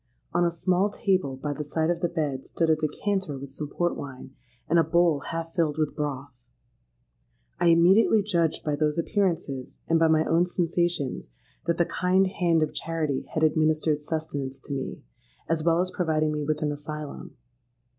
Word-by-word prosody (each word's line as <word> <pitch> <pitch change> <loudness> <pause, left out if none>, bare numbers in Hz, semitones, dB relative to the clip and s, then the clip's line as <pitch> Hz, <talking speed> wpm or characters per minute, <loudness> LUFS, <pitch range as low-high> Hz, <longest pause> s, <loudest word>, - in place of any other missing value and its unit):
On 175 - +3
a 170 - +3
small 180 +3 +1
table 185 -9 0
by 145 +2 -3
the 150 - -4
side 160 +3 0
of 170 - -2
the 175 - +1
bed 150 -6 -2
stood 165 +2 0
a - - +5
decanter 155 +1 -2
with 135 0 -9
some 150 +2 -5
port 175 +4 -1
wine, 130 -1 -8 0.3
and 170 +2 +4
a - - +5
bowl 170 -4 +3
half 165 0 -4
filled 160 -4 0
with 155 -2 -1
broth. 145 -2 -3 1.3
I 175 - +3
immediately 190 +6 +5
judged 170 -6 0
by 150 -1 0
those 150 +1 0
appearances, 165 - -1
and 165 0 +3
by 165 - +5
my 160 0 +3
own 170 +2 +3
sensations, 175 - -1 0.4
that 170 - +1
the 170 - +3
kind 185 +2 +2
hand 170 -4 +2
of 155 - -2
charity 160 -4 -2
had 160 - +1
administered 155 -1 +2
sustenance 145 -4 -3
to 140 - -6
me, 135 -1 -5 0.4
as 165 -1 0
well 165 0 +3
as 185 0 -2
providing 155 -4 0
me 150 0 -2
with 155 +1 -1
an 150 - 0
asylum. 150 0 -7
160 Hz, 180 wpm, -26 LUFS, 150-175 Hz, 1.3 s, a